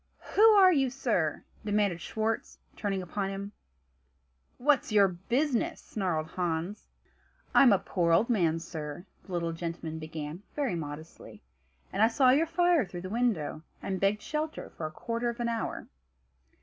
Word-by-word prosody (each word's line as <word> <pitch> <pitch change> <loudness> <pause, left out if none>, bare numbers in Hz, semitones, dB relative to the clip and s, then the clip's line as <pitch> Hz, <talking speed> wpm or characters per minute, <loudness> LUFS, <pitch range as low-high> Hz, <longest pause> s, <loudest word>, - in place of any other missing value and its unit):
"Who 410 - +3
are 405 -4 +8
you, 270 -4 +2
sir?" 220 - -1 0.2
demanded 205 -5 +1
Schwartz, 220 +1 -2 0.2
turning 195 -3 -2
upon 195 +3 -3
him. 195 +1 -5 1.1
"What's 275 -2 +2
your 205 -2 +6
business?" 250 - -1
snarled 180 -7 -2
Hans. 175 +3 -3 0.7
"I'm 265 -4 +7
a 200 - +6
poor 175 -3 0
old 170 +8 +4
man, 175 -9 +2
sir," 160 0 -6 0.2
the - - -12
little 170 -2 -1
gentleman 165 -1 -5
began 155 +1 -6
very 280 -8 0
modestly, 155 -1 -8 0.5
"and 195 - 0
I 220 - +7
saw 255 +2 +4
your 305 +5 +3
fire 350 -2 +3
through 180 -3 -7
the 185 - -6
window, 215 -11 0 0.2
and 190 -1 -3
begged 205 +2 +1
shelter 310 +1 -4
for 155 - -5
a - - -9
quarter 235 +8 -2
of 235 +1 -6
an 235 0 0
hour." 230 -1 -3
200 Hz, 155 wpm, -29 LUFS, 170-245 Hz, 1.1 s, are